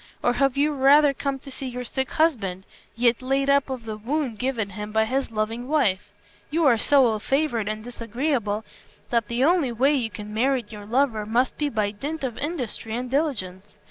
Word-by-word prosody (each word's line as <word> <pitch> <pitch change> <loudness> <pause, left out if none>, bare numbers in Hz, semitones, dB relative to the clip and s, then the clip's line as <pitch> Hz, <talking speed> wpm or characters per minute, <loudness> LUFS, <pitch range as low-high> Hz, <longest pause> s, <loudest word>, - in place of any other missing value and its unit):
Or 245 - +3
have 275 0 +1
you 295 +2 +3
rather 285 +1 +5
come 275 0 -2
to 270 +1 -11
see 265 0 -5
your 250 0 -5
sick 265 +2 -2
husband, 205 - 0 0.3
yet 235 +1 +2
laid 270 +2 +1
up 280 -1 +3
of 255 -3 -5
the 215 -1 -5
wound 250 0 -2
given 235 -6 -1
him 210 +2 -6
by 220 +1 +2
his 265 +4 -1
loving 225 +2 -3
wife? 260 -11 +1 0.4
You 325 +1 +1
are 255 -4 +6
so 275 +1 +5
ill 220 -2 +1
favored 270 -4 0
and 215 0 -3
disagreeable 235 -2 -2 0.5
that 230 -3 +1
the 235 +2 0
only 320 -4 +3
way 265 +5 +3
you 245 -6 0
can 210 -1 -8
merit 245 -1 0
your 205 -1 -9
lover 230 -3 +1
must 245 +4 +1
be 295 -1 +1
by 215 -5 0
dint 285 +9 -5
of 250 -4 -2
industry 255 -7 -3
and 250 +1 -4
diligence. 210 - -2
245 Hz, 200 wpm, -24 LUFS, 220-275 Hz, 0.5 s, are